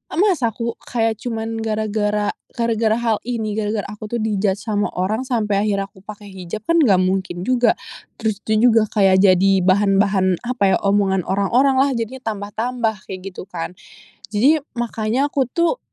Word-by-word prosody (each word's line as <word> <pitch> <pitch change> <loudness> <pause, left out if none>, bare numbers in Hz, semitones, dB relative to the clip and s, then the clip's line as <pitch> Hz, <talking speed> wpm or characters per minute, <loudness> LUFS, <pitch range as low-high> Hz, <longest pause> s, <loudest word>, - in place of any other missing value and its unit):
masa 345 - +2
aku 235 +1 -4
kayak 225 -2 0
cuman 225 -1 -4
gara-gara 215 -1 -1 0.3
gara-gara 230 -2 +1
hal 230 -2 0
ini 225 -3 -2
gara-gara 210 -1 -1
aku 210 +1 -8
tuh - - -1
di 215 -2 -1
judge 200 0 0
sama 210 -2 0
orang 215 +8 -1
sampai 210 -5 0
akhirnya 195 -1 -1
pakai 205 +1 -11
hijab 190 +2 -7
kan 335 0 +2
nggak 200 - +4
mungkin 185 -1 -1
juga. 245 +1 +3 0.5
Terus 215 -2 -1
tuh 215 - +1
juga 225 -3 +5
kayak 195 -3 +3
jadi 190 +1 +4
bahan-bahan 195 -1 +3
apa 205 -7 +2
yah - - -11
omongan 195 -2 +2
orang-orang 240 +8 +2
lah 280 - +3
jadinya 245 +3 -4
tambah-tambah, 220 +1 -2
kayak 190 0 -7
gitu - - -8
kan. 170 -1 -5 0.6
Jadi 270 +10 +4 0.2
makanya 240 +3 -1
aku 270 -3 +1
tuh 340 - 0
215 Hz, 160 wpm, -20 LUFS, 195-235 Hz, 0.6 s, juga